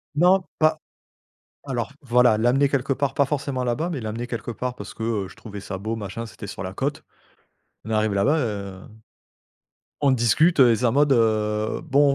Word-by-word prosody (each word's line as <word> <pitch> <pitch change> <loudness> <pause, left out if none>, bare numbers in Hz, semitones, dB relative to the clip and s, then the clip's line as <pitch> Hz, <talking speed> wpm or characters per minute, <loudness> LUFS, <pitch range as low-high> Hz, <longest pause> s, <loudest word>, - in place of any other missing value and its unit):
Non 180 +4 +4 0.2
pas 155 0 +3 0.9
alors 125 -2 -3
voilà, 125 -4 +3
l'amener 125 +5 +3
quelque 135 0 0
part 140 0 -1
pas 140 - +3
forcément 140 -2 -2
là-bas, 145 +8 -1
mais 150 -7 -3
l'amener 115 +2 -4
quelque 120 -1 -5
part 125 +1 -4
parce 100 -4 -9
que, - - -8 0.2
heu, - - -11
je - - -15
trouvais 105 -2 -9
ça 95 -1 -6
beau 110 +4 -3
machin, 110 +1 -5
c'était 110 -1 -10
sur 100 - -7
la 95 -1 -5
côte. 140 +8 -3 0.8
On 110 - -7
est - - +1
arrivé 110 -1 +1
là-bas, 135 +11 +2
heu, 100 -7 -4 1.2
on 140 -2 +4
discute 130 - +3
et 120 -3 +7
c'est 125 - -1
en 115 - +3
mode, 145 +3 +3
heu, 110 -2 +1
bon 145 -2 +3
120 Hz, 195 wpm, -23 LUFS, 110-140 Hz, 1.2 s, et